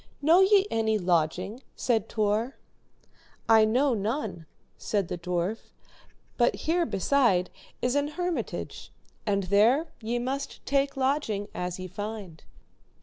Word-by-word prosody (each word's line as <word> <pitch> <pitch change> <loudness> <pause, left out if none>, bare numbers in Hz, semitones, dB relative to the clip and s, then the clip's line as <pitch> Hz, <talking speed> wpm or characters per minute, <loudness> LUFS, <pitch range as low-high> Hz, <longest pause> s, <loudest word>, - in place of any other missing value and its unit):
Know 325 +5 +5
ye 390 0 +5
any 220 -1 +1
lodging? 180 +5 0
said 225 -4 0
Tor. 215 +4 0 0.9
I 220 -1 +6
know 255 +5 +2
none, 210 - -3 0.3
said 200 -5 -2
the - - -3
dwarf, 180 +4 -3 0.6
but 240 -1 +3
here 335 +1 0
beside 195 -4 +2 0.3
is 250 0 +2
an 285 0 +1
hermitage, 350 +3 -4 0.4
and 200 -1 +1
there 225 - +3
ye 230 +2 -1
must 265 +3 -4
take 275 0 +1
lodging 260 -7 0
as 180 0 -3
ye 185 - -6
find. 200 -3 -7
220 Hz, 125 wpm, -27 LUFS, 195-275 Hz, 0.9 s, I